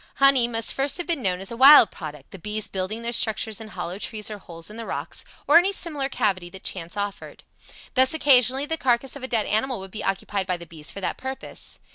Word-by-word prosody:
Honey 275 Hz, -3 st, +5 dB
must 230 Hz, -1 st, 0 dB
first 275 Hz, +1 st, +1 dB
have 350 Hz, -, -4 dB
been 335 Hz, -5 st, -2 dB
known 185 Hz, -3 st, -1 dB
as 195 Hz, -, -4 dB
a -, -, -5 dB
wild 265 Hz, -3 st, +8 dB
product, 150 Hz, -4 st, -10 dB
the 195 Hz, -, -10 dB
bees 210 Hz, +3 st, -2 dB
building 195 Hz, +4 st, -4 dB
their 235 Hz, +1 st, -2 dB
structures 220 Hz, -1 st, 0 dB
in 220 Hz, -, -8 dB
hollow 185 Hz, -1 st, -6 dB
trees 215 Hz, -1 st, -5 dB
or 210 Hz, -, -7 dB
holes 165 Hz, -3 st, -8 dB
in 210 Hz, -, -9 dB
the 230 Hz, 0 st, -7 dB
rocks, -, -, -5 dB, 0.2 s
or 310 Hz, +4 st, +8 dB
any 380 Hz, +3 st, +1 dB
similar 300 Hz, -8 st, -2 dB
cavity 185 Hz, -8 st, -1 dB
that 190 Hz, +2 st, -12 dB
chance 175 Hz, 0 st, -3 dB
offered. 200 Hz, -1 st, -5 dB, 0.5 s
Thus 260 Hz, +3 st, +4 dB
occasionally 265 Hz, -2 st, +4 dB
the 320 Hz, +2 st, -3 dB
carcass 250 Hz, -1 st, 0 dB
of 280 Hz, -, -8 dB
a 260 Hz, -, -4 dB
dead 230 Hz, -4 st, 0 dB
animal 235 Hz, +2 st, -1 dB
would 190 Hz, 0 st, -10 dB
be 215 Hz, -, -6 dB
occupied 195 Hz, 0 st, -2 dB
by 180 Hz, -2 st, -1 dB
the 170 Hz, -, -11 dB
bees 160 Hz, -3 st, -7 dB
for 200 Hz, -, -7 dB
that -, -, -2 dB
purpose. 265 Hz, 0 st, -8 dB
220 Hz, 235 wpm, -24 LUFS, 190-265 Hz, 0.5 s, wild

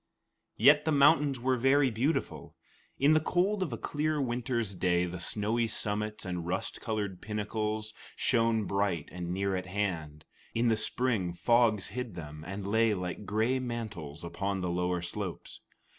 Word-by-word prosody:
Yet 150 Hz, +1 st, +6 dB
the 160 Hz, -, +2 dB
mountains 145 Hz, -2 st, +4 dB
were 130 Hz, +1 st, +1 dB
very 135 Hz, +2 st, +4 dB
beautiful. 130 Hz, +9 st, -2 dB, 0.4 s
In 145 Hz, +3 st, +5 dB
the 155 Hz, -, +5 dB
cold 185 Hz, +6 st, +1 dB
of 175 Hz, -7 st, -1 dB
a 115 Hz, -, -3 dB
clear 150 Hz, +4 st, -1 dB
winter's 120 Hz, -4 st, -1 dB
day, 90 Hz, -1 st, +1 dB
the 90 Hz, 0 st, -5 dB
snowy 110 Hz, +6 st, 0 dB
summits 105 Hz, -1 st, -1 dB
and 90 Hz, -2 st, -4 dB
rust 90 Hz, +2 st, -2 dB
colored 100 Hz, -5 st, -3 dB
pinnacles 110 Hz, 0 st, -3 dB, 0.2 s
shone 115 Hz, -3 st, +2 dB
bright 100 Hz, -6 st, -1 dB
and 90 Hz, -1 st, -5 dB
near 95 Hz, +2 st, 0 dB
at 95 Hz, 0 st, -4 dB
hand; 85 Hz, -6 st, -3 dB, 0.3 s
in 115 Hz, +1 st, +3 dB
the 110 Hz, -, +4 dB
spring, 110 Hz, -4 st, 0 dB
fogs 115 Hz, -1 st, +3 dB
hid 125 Hz, -6 st, -5 dB
them, 75 Hz, -2 st, -8 dB
and 95 Hz, +1 st, -5 dB
lay 110 Hz, +1 st, +3 dB
like 90 Hz, +2 st, -5 dB
gray 110 Hz, +5 st, +1 dB
mantles 110 Hz, -, -5 dB
upon 95 Hz, +3 st, -2 dB
the 90 Hz, -1 st, -1 dB
lower 90 Hz, 0 st, -1 dB
slopes. 95 Hz, 0 st, -5 dB
105 Hz, 160 wpm, -30 LUFS, 90-125 Hz, 0.4 s, Yet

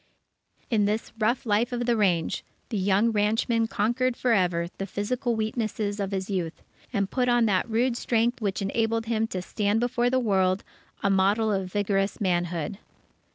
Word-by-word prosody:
In 210 Hz, -3 st, +3 dB
this 210 Hz, +2 st, -1 dB
rough 235 Hz, +5 st, +1 dB
life 225 Hz, +3 st, +1 dB
of 245 Hz, 0 st, -2 dB
the 240 Hz, -1 st, +2 dB
range, 180 Hz, -7 st, +1 dB, 0.3 s
the 225 Hz, -, -2 dB
young 200 Hz, +4 st, +3 dB
ranchman 225 Hz, +2 st, +1 dB
conquered 240 Hz, +3 st, 0 dB
for 245 Hz, -2 st, +2 dB
ever 175 Hz, -4 st, +2 dB
the 195 Hz, -, -3 dB
physical 235 Hz, +5 st, -1 dB
weaknesses 215 Hz, -2 st, -2 dB
of 200 Hz, -1 st, -1 dB
his 190 Hz, -1 st, -3 dB
youth, 180 Hz, -5 st, -3 dB, 0.3 s
and 200 Hz, -5 st, -1 dB
put 250 Hz, -1 st, +1 dB
on 240 Hz, -1 st, +4 dB
that 205 Hz, +2 st, +1 dB
rude 235 Hz, +2 st, +1 dB
strength 235 Hz, 0 st, 0 dB
which 200 Hz, -2 st, -1 dB
enabled 225 Hz, +3 st, 0 dB
him 225 Hz, -1 st, 0 dB
to 185 Hz, -4 st, -4 dB
stand 205 Hz, +3 st, 0 dB
before 245 Hz, 0 st, +1 dB
the 260 Hz, -, +2 dB
world, 190 Hz, -5 st, +1 dB, 0.4 s
a 200 Hz, -, +3 dB
model 200 Hz, +3 st, +3 dB
of 190 Hz, -2 st, -2 dB
vigorous 200 Hz, -1 st, 0 dB
manhood. 175 Hz, 0 st, -1 dB
215 Hz, 170 wpm, -26 LUFS, 195-235 Hz, 0.4 s, on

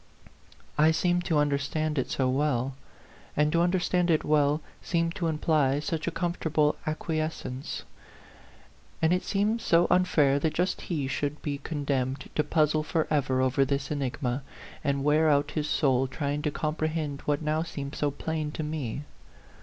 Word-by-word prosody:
I 155 Hz, +1 st, +6 dB
seemed 175 Hz, +2 st, +1 dB
to 160 Hz, -, +1 dB
understand 145 Hz, +1 st, 0 dB
it 130 Hz, -, -2 dB
so 130 Hz, -, +1 dB
well, 135 Hz, -1 st, +1 dB, 0.6 s
and 150 Hz, +1 st, +3 dB
to 170 Hz, +1 st, +3 dB
understand 180 Hz, 0 st, +2 dB
it 160 Hz, -2 st, +3 dB
well 150 Hz, 0 st, +3 dB, 0.2 s
seemed 165 Hz, -1 st, 0 dB
to 170 Hz, -4 st, 0 dB
imply 150 Hz, -3 st, +2 dB
such 160 Hz, +2 st, -3 dB
a -, -, +4 dB
comfortable 160 Hz, -4 st, 0 dB
acquiescence; 155 Hz, -4 st, -3 dB, 1.2 s
and 160 Hz, +2 st, +3 dB
it 180 Hz, -, +1 dB
seemed 210 Hz, +3 st, 0 dB
so 170 Hz, -2 st, +4 dB
unfair 155 Hz, -6 st, +4 dB
that 155 Hz, +1 st, -1 dB
just 180 Hz, +2 st, 0 dB
he 150 Hz, -6 st, -2 dB
should 145 Hz, +2 st, -2 dB
be 145 Hz, -2 st, -2 dB
condemned 140 Hz, -3 st, -2 dB
to 150 Hz, -, +2 dB
puzzle 155 Hz, 0 st, +2 dB
forever 150 Hz, -5 st, 0 dB
over 130 Hz, +1 st, +3 dB
this 135 Hz, +1 st, -1 dB
enigma, 135 Hz, -2 st, -2 dB, 0.4 s
and 140 Hz, -2 st, 0 dB
wear 155 Hz, +2 st, +4 dB
out 145 Hz, 0 st, +2 dB
his 150 Hz, -1 st, -2 dB
soul 135 Hz, -3 st, +2 dB
trying 145 Hz, +2 st, -2 dB
to 150 Hz, -, 0 dB
comprehend 155 Hz, -1 st, -2 dB
what 145 Hz, +1 st, 0 dB
now 155 Hz, +1 st, +1 dB
seemed 140 Hz, -4 st, -5 dB
so 145 Hz, -, 0 dB
plain 155 Hz, +2 st, -3 dB
to 155 Hz, -, -3 dB
me. 150 Hz, -4 st, -3 dB
150 Hz, 155 wpm, -28 LUFS, 140-160 Hz, 1.2 s, I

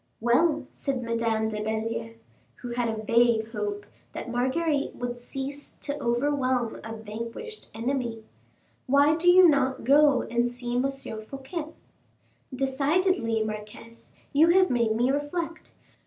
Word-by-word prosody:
"Well," 285 Hz, +5 st, +2 dB
said 265 Hz, -3 st, -3 dB
Madame 230 Hz, -1 st, 0 dB
de 210 Hz, -1 st, -4 dB
Belliere, 225 Hz, +1 st, -3 dB, 0.4 s
who 245 Hz, -, -8 dB
had 240 Hz, 0 st, -1 dB
a 220 Hz, -1 st, -4 dB
vague 230 Hz, 0 st, +3 dB
hope 205 Hz, -2 st, -3 dB, 0.3 s
that 240 Hz, -, -6 dB
Marguerite 275 Hz, +5 st, 0 dB
would 245 Hz, 0 st, -4 dB
cease 270 Hz, +3 st, -7 dB
to 285 Hz, -, -3 dB
overwhelm 255 Hz, -1 st, 0 dB
a 225 Hz, +1 st, -6 dB
vanquished 230 Hz, -, -8 dB
enemy, 235 Hz, -1 st, -2 dB, 0.6 s
"why 285 Hz, +3 st, +5 dB
do 345 Hz, +2 st, +3 dB
you 365 Hz, 0 st, +8 dB
not 275 Hz, -4 st, +2 dB
go 280 Hz, +1 st, +5 dB
and 240 Hz, 0 st, 0 dB
see 245 Hz, 0 st, -5 dB
M. 260 Hz, +2 st, +2 dB
Fouquet?" 270 Hz, +5 st, -7 dB, 0.8 s
"Decidedly, 270 Hz, -, +1 dB
marquise, 215 Hz, +2 st, -8 dB, 0.2 s
you 305 Hz, +4 st, +6 dB
have 370 Hz, +2 st, +5 dB
made 235 Hz, -3 st, +2 dB
me 245 Hz, +3 st, +2 dB
reflect. 330 Hz, +4 st, -3 dB
245 Hz, 130 wpm, -27 LUFS, 230-285 Hz, 0.8 s, you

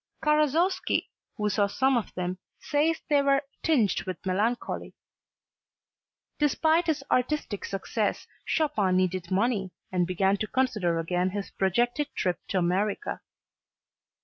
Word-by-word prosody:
Karasowski 305 Hz, +5 st, +2 dB, 0.3 s
who 210 Hz, -1 st, 0 dB
saw 205 Hz, 0 st, +2 dB
some 265 Hz, +6 st, +2 dB
of 235 Hz, -, -1 dB
them 180 Hz, 0 st, -3 dB, 0.2 s
says 310 Hz, +2 st, +1 dB
they 290 Hz, -2 st, +4 dB
were 275 Hz, 0 st, +3 dB, 0.2 s
tinged 250 Hz, -11 st, +2 dB
with 185 Hz, -, -5 dB
melancholy. 210 Hz, +6 st, -1 dB, 1.4 s
Despite 315 Hz, +3 st, +3 dB
his 305 Hz, -4 st, 0 dB
artistic 250 Hz, -5 st, 0 dB
success 200 Hz, +2 st, -2 dB, 0.2 s
Chopin 205 Hz, -, +1 dB
needed 185 Hz, -1 st, 0 dB
money 195 Hz, 0 st, +1 dB, 0.2 s
and 180 Hz, -2 st, +1 dB
began 190 Hz, +2 st, +2 dB
to 215 Hz, -, -2 dB
consider 210 Hz, -11 st, +1 dB
again 180 Hz, +2 st, 0 dB
his 200 Hz, +1 st, -5 dB
projected 240 Hz, +9 st, +1 dB
trip 180 Hz, -3 st, 0 dB
to 195 Hz, -, -1 dB
America. 190 Hz, -, 0 dB
210 Hz, 120 wpm, -27 LUFS, 185-280 Hz, 1.4 s, they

